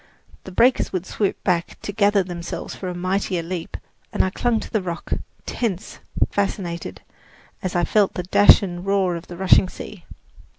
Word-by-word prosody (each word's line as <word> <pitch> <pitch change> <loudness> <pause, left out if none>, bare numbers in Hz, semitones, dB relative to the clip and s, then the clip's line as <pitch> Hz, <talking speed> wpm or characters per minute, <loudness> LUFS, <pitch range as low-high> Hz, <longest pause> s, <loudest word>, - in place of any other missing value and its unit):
The 190 - -8
breakers 240 +7 +3
would 185 -1 -2
swoop 200 +1 -2
back 175 -2 0
to - - -4
gather 205 -1 +3
themselves 175 -1 -6
for 190 - -6
a 180 - -3
mightier 185 -1 -1
leap, 170 0 -5 0.3
and - - +2
I 190 - -1
clung 235 +2 +1
to - - -9
the 215 - +1
rock, 175 -2 -4 0.3
tense, 200 -7 -3 0.3
fascinated, 185 -4 -3 0.6
as 185 -1 -3
I 175 - +2
felt 205 +2 +2
the 180 - -2
dash 205 +3 +6
and 175 -2 -4
roar 195 -2 +1
of 170 +1 -7
the 175 - -8
rushing 190 0 +5
sea! 190 -1 -10
185 Hz, 175 wpm, -22 LUFS, 175-200 Hz, 0.6 s, dash